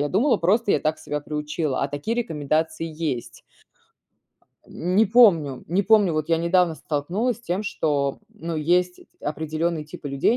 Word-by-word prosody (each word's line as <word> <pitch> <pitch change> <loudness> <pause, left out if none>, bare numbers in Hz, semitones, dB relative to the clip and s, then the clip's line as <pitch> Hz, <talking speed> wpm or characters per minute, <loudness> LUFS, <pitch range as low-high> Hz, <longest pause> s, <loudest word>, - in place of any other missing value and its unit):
Я 145 - 0
думала 245 +8 +3
просто 205 +6 +2
я - - +2
так 155 0 -1
себя 150 -1 -4
приучила, 150 -1 -3
а 140 - 0
такие 145 +11 -3
рекомендации 160 - -1
есть. 155 -6 -4 1.3
Не 185 +6 +1
помню 175 - +4
не 185 +4 +1
помню 205 -4 +4
вот 155 0 -2
я 165 - +3
недавно 170 0 +2
столкнулась 170 - -2
с - - -19
тем, 190 -2 -2
что, 145 -8 -1
ну 165 0 -6
есть 180 +3 +1
эти - - -18
определенные 155 +2 -2
типы 150 -1 -8
людей. 140 - +2
165 Hz, 160 wpm, -23 LUFS, 150-185 Hz, 1.3 s, помню